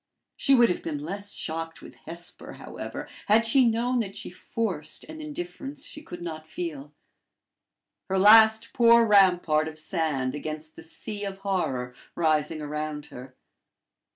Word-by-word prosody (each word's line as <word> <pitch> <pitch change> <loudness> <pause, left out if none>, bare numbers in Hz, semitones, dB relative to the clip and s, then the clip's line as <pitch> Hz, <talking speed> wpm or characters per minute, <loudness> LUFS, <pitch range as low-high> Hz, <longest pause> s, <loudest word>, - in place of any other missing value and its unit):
She 275 - +4
would 240 -2 +6
have 180 - -1
been 155 -3 -3
less 200 +7 -5
shocked 165 0 -4
with - - -12
Hesper, 170 +1 -7
however, - - -7 0.2
had 220 +2 +5
she 250 +2 +5
known 240 +2 +1
that 200 -4 -3
she - - -7
forced 180 -4 -4
an 315 0 -9
indifference 300 -3 -6
she 300 - -8
could 175 - -9
not 155 -2 -6
feel 155 -4 -6 1.2
her 190 - +1
last 220 +2 +7
poor 235 -1 +6
rampart 180 -7 +4
of 155 0 -8
sand 155 -5 -1
against 155 +1 -6
the - - -10
sea 205 +6 -7
of 195 -1 -4
horror 130 -11 -1 0.2
rising 155 -1 +1
around 150 0 -4
her. 130 +1 -10
175 Hz, 150 wpm, -26 LUFS, 155-225 Hz, 1.2 s, last